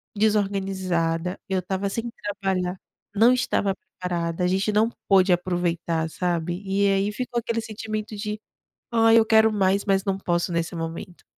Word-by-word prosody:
desorganizada, 190 -5 0
eu 190 - +1
estava 190 +2 -2
sem 230 +3 -3 0.3
trabalhar, 185 -1 -1 0.4
não 230 +4 +6
estava 210 -6 0
preparada, 175 -2 -4
a - - +3
gente 190 +3 +1
não 215 +2 +3 0.2
pôde 190 -2 +5
aproveitar, 175 -2 -1
sabe? 175 0 -2
E 195 +1 +2
aí, 195 +1 +2
ficou 240 +2 -3
aquele 230 0 -2
sentimento 215 0 -5
de 210 +1 -4 0.5
"Ai, 225 0 +6
eu - - +3
quero 220 0 +5
mais, 200 -1 +2
mas 195 -2 +1
não 195 -2 -1
posso 175 -2 -1
nesse 170 +1 -2
momento". 165 +2 -6
195 Hz, 155 wpm, -24 LUFS, 180-210 Hz, 0.5 s, não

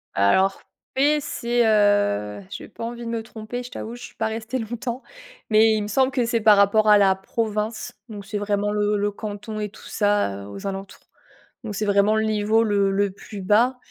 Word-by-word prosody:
Alors 190 - +3 0.3
P 290 +3 +3
c'est, 240 -3 0
heu 205 - +2
j'ai - - -8
pas - - -10
envie 235 +1 -5
de - - -4
me 230 -1 -2
tromper, 220 +2 -7
je 245 - -9
t'avoue, 230 +2 -6
je 245 - -12
suis - - -11
pas 220 - -1
restée 225 +3 -4
longtemps. 240 +2 -5 0.5
Mais 220 0 +5
il 215 -1 0
me - - -4
semble 260 +5 +2
que 250 -2 0
c'est 230 -1 0
par 210 -1 +6
rapport 215 +2 +4
à 210 - +8
la 195 -2 +4
province, 215 +2 -3 0.2
donc 205 -2 -8
c'est 205 +1 -4
vraiment 205 0 0
le 210 0 +1
le 205 0 0
canton 215 +1 -6
et 210 -1 -3
tout 200 - -16
ça, 205 - 0
heu, - - -10
aux 195 - -9
alentours. 195 0 -6 0.6
Donc 210 -3 -5
c'est 215 - -1
vraiment 200 +1 +3
le 220 0 +1
niveau 215 +1 +2
le 200 -2 +2
le 200 0 +1
plus 200 +1 -10
bas 230 +7 +3
210 Hz, 210 wpm, -23 LUFS, 205-230 Hz, 0.6 s, à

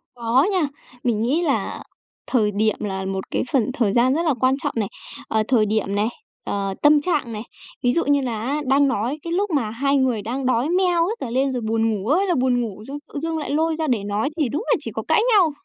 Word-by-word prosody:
Có 240 +5 +2
nha, 365 -6 +1 0.4
mình 225 -3 +1
nghĩ 275 +9 +1
là 345 - -1 0.4
thời 215 -5 +2
điểm 215 +1 +1
là 190 -2 -3
một 190 0 -3
cái - - 0
phần 255 -2 +2
thời 210 -5 +1
gian 250 +2 +4
rất 330 +4 0
là 310 - +3
quan 260 +1 +3
trọng - - -1
này. 210 -3 0 0.4
Ờ, 220 0 +1
thời 235 -5 +3
điểm 210 -1 -1
này, 210 +2 +2 0.4
ờ, 195 -1 -2
tâm 295 0 +6
trạng 285 -8 -1
này. 210 +1 -5 0.4
Ví 245 - +4
dụ 335 - +1
như 285 -1 +3
là 235 -4 -3
á 285 +6 -1
đang 275 +2 +4
nói 260 +4 -1
cái 335 0 -3
lúc 405 +2 0
mà 270 -9 0
hai 275 +5 +1
người 250 -5 +1
đang 255 +5 -3
đói 255 +4 +1
meo 360 -1 +2
hết 435 - -1
cả 255 - -4
lên 265 +3 +1
rồi 250 -2 -2
buồn 225 +1 +1
ngủ 205 0 -3
ơi 355 +8 +3
là 350 - +2
buồn 250 -1 +2
ngủ, 215 -2 -5
d - - -8 0.2
tự 290 - -3
dưng 325 +1 -2
lại 300 - -4
lôi 320 +2 +1
ra 315 -1 -2
để 235 -6 0
nói 205 +5 -1
thì 285 -6 +2
đúng 305 - -2
là - - +4
chỉ - - -6
có - - -4
cãi 430 - +4
nhau. 360 -6 +5
255 Hz, 255 wpm, -22 LUFS, 220-300 Hz, 0.4 s, tâm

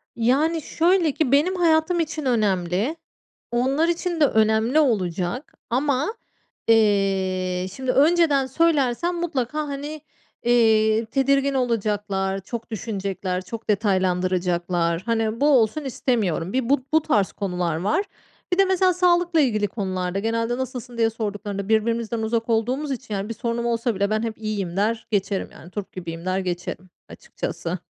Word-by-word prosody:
Yani, 280 +8 +2
şöyle 335 +1 +2
ki 280 -2 -1
benim 305 +7 +3
hayatım 340 0 +2
için 315 -2 -2
önemli. 205 - +1 0.6
Onlar 265 +7 +1
için 345 0 -1
de - - +8
önemli 220 +3 +3
olacak 205 - -1 0.2
ama, 280 - 0 0.5
eee, 190 -4 +2
şimdi 260 +2 -2
önceden 295 -1 +4
söylersem 305 +2 +1
mutlaka, 305 -5 -2
hani, 290 +2 -5 0.4
eee, 225 -2 +3
tedirgin 275 +4 +1
olacaklar, 205 -6 -1
çok 230 +4 -7
düşünecekler, 195 -4 -3
çok 230 +3 -8
detaylandıracaklar. 180 -4 +1
Hani, 225 0 -1
bu 290 - +4
olsun 265 +2 +3
istemiyorum. 205 - -1
Bir 255 -2 0
bu 275 -2 +2
bu 315 - +5
tarz 210 -11 +1
konular 180 -4 -2
var. 300 - 0 0.5
Bir - - +1
de 390 - +6
mesela 375 -1 +3
sağlıkla 350 -1 +3
ilgili 215 -6 +1
konularda 185 -2 -3
genelde 230 +3 -1
nasılsın 250 -2 -5
diye 225 -1 +3
sorduklarında 205 -2 -4
birbirimizden 230 +1 +1
uzak 225 +1 -1
olduğumuz 250 +6 0
için, 250 -4 -5
yani, 200 +1 -3
bir - - -2
sorunum 235 +1 -3
olsa 235 -1 0
bile 200 +1 0
ben 215 +1 0
hep 225 -1 -3
iyiyim 205 -5 -3
der 220 +2 0
geçerim. 200 -1 -1
Yani, 170 - -14
turp 205 0 -6
gibiyim 170 -2 -7
der 185 +1 0
geçerim 180 0 -4 0.2
açıkçası. - - -5
230 Hz, 140 wpm, -23 LUFS, 195-275 Hz, 0.6 s, de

